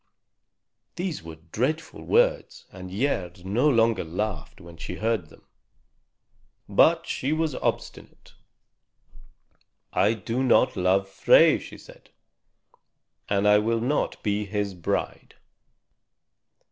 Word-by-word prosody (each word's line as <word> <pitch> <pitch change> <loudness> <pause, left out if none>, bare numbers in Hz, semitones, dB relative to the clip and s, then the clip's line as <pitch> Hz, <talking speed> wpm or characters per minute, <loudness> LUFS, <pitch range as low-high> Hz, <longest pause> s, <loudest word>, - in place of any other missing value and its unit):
These 175 -1 -4
were 80 0 -10 0.2
dreadful 150 +8 -2
words, - - +1
and 95 -1 -9
Gerd 90 -5 -3
no 120 +10 +2
longer 115 -4 +2
laughed 85 -2 -5
when 85 0 -13
she 85 +2 -7
heard 110 -6 -2
them. - - -20 1.2
But 165 +12 +4
she 135 - -3
was 155 -1 0
obstinate. - - -5 1.6
"I 105 +4 +2
do 115 +3 -3
not 130 0 +3
love 95 +1 +1
Frey," 95 - +5
she - - -11
said, - - -17 1.2
"and 100 0 +1
I 105 0 +6
will 115 +2 0
not 130 +6 -2
be 105 0 -1
his 100 -1 -3
bride." 85 -3 -4
105 Hz, 110 wpm, -25 LUFS, 95-130 Hz, 1.6 s, I